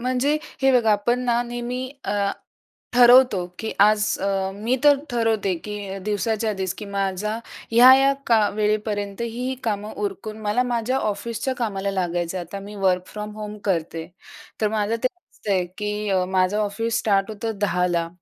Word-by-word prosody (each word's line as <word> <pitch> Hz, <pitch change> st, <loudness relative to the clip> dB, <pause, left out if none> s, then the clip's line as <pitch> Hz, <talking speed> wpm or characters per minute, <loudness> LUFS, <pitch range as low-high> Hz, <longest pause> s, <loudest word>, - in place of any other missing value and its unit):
म्हणजे, 255 Hz, +4 st, +1 dB, 0.3 s
हे 270 Hz, -, +5 dB
बघा, 230 Hz, -4 st, +4 dB
आपण 240 Hz, +4 st, +1 dB
ना 240 Hz, 0 st, +2 dB
नेहमी 240 Hz, +1 st, -4 dB, 0.2 s
अ, 200 Hz, -1 st, 0 dB, 0.6 s
ठरवतो 245 Hz, -6 st, +6 dB
की 220 Hz, -, -3 dB
आज 210 Hz, +1 st, +5 dB, 0.2 s
अ, 195 Hz, -1 st, 0 dB
मी 230 Hz, +6 st, 0 dB
तर 290 Hz, -1 st, +7 dB
ठरवते, 225 Hz, -5 st, +1 dB
की 205 Hz, -2 st, -5 dB
दिवसाच्या 215 Hz, +1 st, 0 dB
आधीच, 190 Hz, -3 st, -3 dB
की 210 Hz, -, -6 dB
माझा 200 Hz, +2 st, -2 dB, 0.3 s
ह्या-ह्या 260 Hz, +4 st, +7 dB
का 220 Hz, -3 st, +4 dB
वेळेपर्यंत 210 Hz, -1 st, -1 dB
ही-ही 245 Hz, +3 st, -3 dB
कामं 210 Hz, -1 st, -2 dB
उरकून 215 Hz, +2 st, -5 dB
मला 215 Hz, +4 st, +1 dB
माझ्या 245 Hz, +1 st, 0 dB
ऑफिसच्या 230 Hz, +5 st, -2 dB
कामाला 200 Hz, -4 st, -2 dB
लागायचं. 175 Hz, -1 st, -2 dB
आता 175 Hz, +3 st, -7 dB
मी 205 Hz, +1 st, -9 dB
वर्क 180 Hz, -1 st, +2 dB
फ्रॉम 210 Hz, 0 st, -7 dB
होम 210 Hz, 0 st, -6 dB
करते. 165 Hz, -3 st, -1 dB, 0.5 s
तर 215 Hz, -, +2 dB
माझं 215 Hz, 0 st, 0 dB
ते -, -, +5 dB
असतंय, 200 Hz, -, -3 dB
की 210 Hz, -1 st, -2 dB, 0.2 s
माझं 185 Hz, +2 st, +2 dB
ऑफिस 215 Hz, +2 st, -1 dB
स्टार्ट 200 Hz, 0 st, +1 dB
होतं 220 Hz, 0 st, -4 dB
10 180 Hz, -3 st, 0 dB
210 Hz, 150 wpm, -23 LUFS, 195-235 Hz, 0.6 s, तर